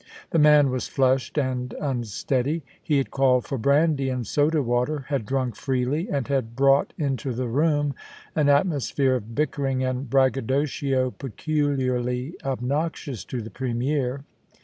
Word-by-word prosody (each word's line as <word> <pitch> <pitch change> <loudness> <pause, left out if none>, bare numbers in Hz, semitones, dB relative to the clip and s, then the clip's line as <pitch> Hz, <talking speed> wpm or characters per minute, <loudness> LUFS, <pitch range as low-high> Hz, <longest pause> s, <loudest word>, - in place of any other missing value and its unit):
The 165 - +3
man 150 -2 +6
was 130 -1 -2
flushed 130 +2 +1
and 130 -3 -1
unsteady. 135 +3 -1 0.2
He 150 -4 +1
had 135 - -1
called 130 -2 +3
for 135 - -3
brandy 140 +2 +2
and 125 -2 -2
soda 150 +6 +2
water, 125 +4 0
had 135 -8 -1
drunk 130 -2 -1
freely, 135 +6 -1
and 140 -4 -1
had 130 -5 -1
brought 135 +2 +4
into 135 -2 -2
the 125 +1 -2
room 145 +3 +1 0.4
an 150 -2 +3
atmosphere 140 -3 +2
of 115 0 -9
bickering 135 -3 0
and 130 0 -2
braggadocio 135 0 +1
peculiarly 130 -1 -1
obnoxious 135 - -2
to 125 -3 -4
the 110 - -9
Premier. 130 +1 -1
135 Hz, 140 wpm, -25 LUFS, 125-145 Hz, 0.4 s, man